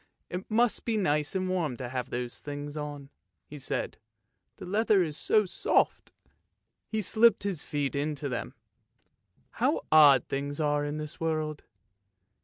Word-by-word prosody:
" -, -, -48 dB
It 180 Hz, +2 st, -5 dB
must 235 Hz, +1 st, +2 dB
be 225 Hz, -2 st, 0 dB
nice 150 Hz, -5 st, 0 dB
and 185 Hz, 0 st, 0 dB
warm 170 Hz, -9 st, -1 dB
to 125 Hz, -2 st, -5 dB
have 125 Hz, 0 st, -4 dB
those 120 Hz, 0 st, -4 dB
things 145 Hz, 0 st, -6 dB
on," 145 Hz, -2 st, -6 dB, 0.3 s
he 150 Hz, -, -10 dB
said, 135 Hz, -, -3 dB, 0.3 s
" 120 Hz, -, -52 dB
the -, -, -8 dB
leather 205 Hz, 0 st, +3 dB
is 155 Hz, -3 st, -4 dB
so 215 Hz, +6 st, +2 dB
soft! 185 Hz, -, 0 dB, 0.4 s
" -, -, -54 dB
He 220 Hz, -1 st, 0 dB
slipped 225 Hz, +4 st, +4 dB
his 195 Hz, -7 st, -2 dB
feet 145 Hz, -2 st, -2 dB
into 145 Hz, 0 st, -2 dB
them. 125 Hz, -3 st, -4 dB, 0.5 s
" -, -, -42 dB
How -, -, +2 dB
odd 145 Hz, -3 st, +7 dB
things 140 Hz, +2 st, -3 dB
are 145 Hz, -1 st, +1 dB
in 145 Hz, +1 st, -3 dB
this 150 Hz, -1 st, -6 dB
world! 155 Hz, -2 st, -2 dB
150 Hz, 170 wpm, -29 LUFS, 145-185 Hz, 0.5 s, odd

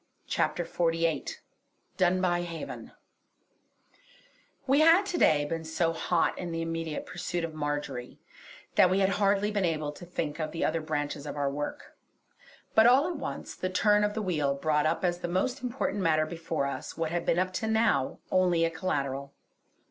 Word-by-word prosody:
CHAPTER -, -, 0 dB
XLVIII 165 Hz, -3 st, 0 dB, 0.7 s
DUNBUY 180 Hz, -1 st, +2 dB
HAVEN 165 Hz, -2 st, -7 dB, 1.7 s
We 275 Hz, +2 st, +4 dB
had 330 Hz, +5 st, +6 dB
to 360 Hz, -3 st, -2 dB
day 145 Hz, -1 st, +4 dB
been 165 Hz, +2 st, -3 dB
so 165 Hz, +1 st, 0 dB
hot 165 Hz, +1 st, +1 dB
in 175 Hz, -2 st, -4 dB
the 165 Hz, 0 st, -2 dB
immediate 165 Hz, -1 st, -3 dB
pursuit 175 Hz, -1 st, -4 dB
of 165 Hz, -1 st, -4 dB
Marjory 145 Hz, -4 st, -4 dB, 0.6 s
that 180 Hz, -, +6 dB
we 185 Hz, -, +2 dB
had 190 Hz, -, +4 dB
hardly 200 Hz, +1 st, +3 dB
been 205 Hz, -2 st, 0 dB
able 155 Hz, -4 st, -1 dB
to 150 Hz, -, -12 dB
think 170 Hz, -3 st, -4 dB
of 155 Hz, -1 st, -2 dB
the 165 Hz, -, 0 dB
other 160 Hz, +1 st, 0 dB
branches 145 Hz, -1 st, -3 dB
of 145 Hz, -, -5 dB
our 140 Hz, -1 st, 0 dB
work; 145 Hz, +1 st, -5 dB, 0.8 s
but 220 Hz, +1 st, +7 dB
all 265 Hz, +6 st, +5 dB
at 350 Hz, -3 st, -3 dB
once, -, -, -5 dB
the 185 Hz, -, -3 dB
turn 210 Hz, +3 st, +3 dB
of 210 Hz, 0 st, 0 dB
the 220 Hz, -, -2 dB
wheel 150 Hz, -7 st, 0 dB
brought 150 Hz, +1 st, +1 dB
up 165 Hz, +3 st, 0 dB
as 175 Hz, 0 st, 0 dB
the 175 Hz, -, -3 dB
most 215 Hz, +10 st, -1 dB
important 250 Hz, -4 st, -2 dB
matter 155 Hz, -3 st, +3 dB
before 165 Hz, -2 st, -3 dB
us 140 Hz, -, -5 dB
what 165 Hz, -1 st, -1 dB
had 170 Hz, 0 st, -1 dB
been 165 Hz, -, +1 dB
up 185 Hz, +1 st, 0 dB
to 220 Hz, -, -2 dB
now 220 Hz, -, +2 dB
only 180 Hz, -3 st, +3 dB
a 165 Hz, -, -1 dB
collateral. 140 Hz, -5 st, -3 dB
165 Hz, 180 wpm, -29 LUFS, 155-185 Hz, 1.7 s, but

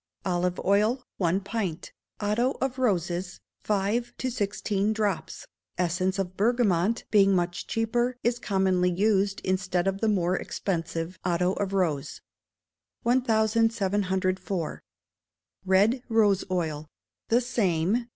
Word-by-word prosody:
Olive 180 Hz, -1 st, 0 dB
oil, 215 Hz, +6 st, +2 dB
one 180 Hz, 0 st, +1 dB
pint; 195 Hz, -5 st, -4 dB, 0.3 s
otto 220 Hz, +6 st, 0 dB
of 265 Hz, -1 st, -2 dB
roses, 180 Hz, -6 st, -1 dB, 0.2 s
five 210 Hz, +4 st, 0 dB
to 255 Hz, -, -2 dB
sixteen 205 Hz, -1 st, -1 dB
drops. 210 Hz, -5 st, -2 dB, 0.3 s
Essence 185 Hz, +2 st, 0 dB
of 185 Hz, -1 st, -3 dB
bergamot, 215 Hz, -2 st, +2 dB
being 195 Hz, -2 st, +5 dB
much 175 Hz, 0 st, -1 dB
cheaper, 240 Hz, +2 st, 0 dB
is 240 Hz, +1 st, +1 dB
commonly 190 Hz, -4 st, +1 dB
used 195 Hz, +1 st, +1 dB
instead 185 Hz, -1 st, 0 dB
of 195 Hz, 0 st, -1 dB
the 225 Hz, -, +2 dB
more 185 Hz, -3 st, +1 dB
expensive 170 Hz, -2 st, -3 dB
otto 180 Hz, +1 st, +1 dB
of 195 Hz, -1 st, -2 dB
rose. 155 Hz, -7 st, -1 dB, 0.8 s
1704. 205 Hz, -6 st, +1 dB, 0.9 s
Red 205 Hz, +7 st, +4 dB
Rose 210 Hz, -4 st, +3 dB
Oil. 160 Hz, -4 st, -2 dB, 0.4 s
The 235 Hz, -, +4 dB
same. 225 Hz, -2 st, 0 dB
195 Hz, 110 wpm, -27 LUFS, 180-225 Hz, 0.9 s, being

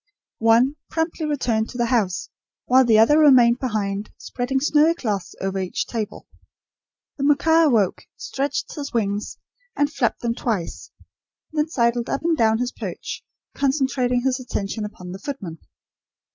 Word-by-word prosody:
One, 235 Hz, +6 st, +4 dB
promptly 320 Hz, -1 st, -2 dB
returned 235 Hz, -7 st, 0 dB
to 250 Hz, -, -8 dB
the 240 Hz, -, +1 dB
house; 210 Hz, -7 st, 0 dB, 0.4 s
while 260 Hz, +1 st, +5 dB
the 230 Hz, -3 st, +4 dB
other 260 Hz, +8 st, +6 dB
remained 250 Hz, -5 st, +6 dB
behind, 210 Hz, -4 st, -2 dB
spreading 260 Hz, +2 st, -2 dB
snowy 305 Hz, +3 st, +3 dB
cloths 210 Hz, -, -3 dB
over 195 Hz, 0 st, -2 dB
each 185 Hz, -1 st, -2 dB
table. 220 Hz, -3 st, -5 dB, 0.9 s
The -, -, -1 dB
macaw 320 Hz, +3 st, +4 dB
awoke, 220 Hz, -, +1 dB
stretched 280 Hz, 0 st, -3 dB
his 285 Hz, -3 st, -6 dB
wings 205 Hz, -3 st, -2 dB, 0.4 s
and 290 Hz, 0 st, 0 dB
flapped 240 Hz, -, 0 dB
them 235 Hz, -1 st, 0 dB
twice, 220 Hz, -8 st, -3 dB, 0.6 s
then 305 Hz, 0 st, 0 dB
sidled 235 Hz, -4 st, 0 dB
up 275 Hz, -, -2 dB
and 335 Hz, 0 st, +2 dB
down 220 Hz, -5 st, +3 dB
his 245 Hz, +1 st, -2 dB
perch, -, -, -6 dB, 0.3 s
concentrating 260 Hz, -3 st, 0 dB
his 265 Hz, 0 st, +1 dB
attention 215 Hz, -3 st, -4 dB
upon 180 Hz, -4 st, -9 dB
the 190 Hz, -, -7 dB
footman. 195 Hz, -, -6 dB
245 Hz, 145 wpm, -22 LUFS, 220-280 Hz, 0.9 s, other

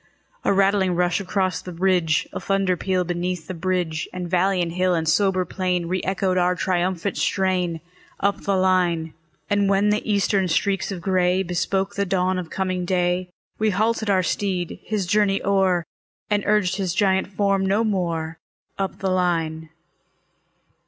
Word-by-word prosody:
A -, -, +2 dB
rattling 195 Hz, -2 st, +2 dB
rush 180 Hz, +1 st, +1 dB
across 185 Hz, -2 st, -1 dB
the 180 Hz, -, -8 dB
ridge, 175 Hz, -3 st, +1 dB
A -, -, -3 dB
thunder 195 Hz, -2 st, +1 dB
peal 185 Hz, +1 st, 0 dB
beneath 175 Hz, -1 st, -3 dB
the 185 Hz, -, -5 dB
bridge; 175 Hz, -2 st, -2 dB
And 180 Hz, -1 st, -5 dB
valley 185 Hz, +2 st, +2 dB
and 170 Hz, -1 st, 0 dB
hill 180 Hz, +1 st, +1 dB
and 160 Hz, -1 st, -1 dB
sober 185 Hz, +2 st, +2 dB
plain 180 Hz, -1 st, -1 dB
Re 185 Hz, +2 st, -1 dB
echoed 190 Hz, -1 st, 0 dB
our 180 Hz, 0 st, +2 dB
triumphant 185 Hz, +1 st, -1 dB
strain, 180 Hz, -4 st, 0 dB, 0.4 s
Up 200 Hz, 0 st, 0 dB
the 200 Hz, -, 0 dB
line. 180 Hz, -4 st, +1 dB, 0.3 s
And 205 Hz, -1 st, +2 dB
when 200 Hz, +1 st, +3 dB
the 210 Hz, +1 st, +1 dB
Eastern 200 Hz, -1 st, +2 dB
streaks 195 Hz, +4 st, 0 dB
of 185 Hz, -3 st, -5 dB
gray 185 Hz, 0 st, +2 dB
Bespoke 190 Hz, +2 st, -1 dB
the 200 Hz, 0 st, -1 dB
dawn 185 Hz, 0 st, +1 dB
of 175 Hz, -3 st, -6 dB
coming 185 Hz, -1 st, -2 dB
day, 180 Hz, 0 st, 0 dB, 0.3 s
We 215 Hz, 0 st, +2 dB
halted 220 Hz, +2 st, 0 dB
our 190 Hz, -2 st, +3 dB
steed, 180 Hz, -1 st, -2 dB
his 210 Hz, -3 st, -2 dB
journey 200 Hz, +1 st, +2 dB
o'er, 190 Hz, -3 st, +2 dB, 0.5 s
And 205 Hz, 0 st, +2 dB
urged 205 Hz, -3 st, +2 dB
his 185 Hz, -3 st, -2 dB
giant 190 Hz, -2 st, +2 dB
form 195 Hz, 0 st, +1 dB
no 200 Hz, +4 st, +2 dB
more, 170 Hz, -6 st, -2 dB, 0.4 s
Up 195 Hz, -1 st, -2 dB
the 190 Hz, -1 st, -1 dB
line. 165 Hz, -3 st, 0 dB
185 Hz, 165 wpm, -23 LUFS, 175-195 Hz, 0.5 s, when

